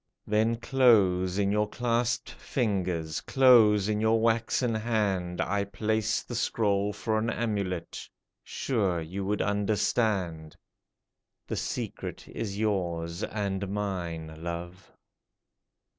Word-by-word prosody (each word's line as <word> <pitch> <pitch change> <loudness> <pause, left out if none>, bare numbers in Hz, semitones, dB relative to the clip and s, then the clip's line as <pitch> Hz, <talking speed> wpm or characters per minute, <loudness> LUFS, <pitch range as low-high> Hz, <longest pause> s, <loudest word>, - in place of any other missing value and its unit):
Then 110 +2 +2
close 100 -8 +3
in 100 -1 +2
your 105 0 +1
clasped 120 0 -1
fingers, 90 - -2
Close 115 -6 +5
in 105 0 0
your 110 +1 +3
waxen 115 +1 +1
hand, 105 -6 -1
I 100 +3 0
placed 110 +2 -1
the - - -6
scroll 105 -3 +1
for 110 +1 -1
an 115 +1 -1
amulet, 100 -7 -3 0.3
Sure 100 -10 -1
you 90 +5 -5
would 105 +2 0
understand! 100 -5 0 0.9
The - - -4
secret - - -5
is 100 -3 -5
yours 85 -5 -1
and 100 -3 -2
mine, 85 -6 -4
love 85 +2 -6
105 Hz, 110 wpm, -28 LUFS, 90-110 Hz, 0.9 s, Close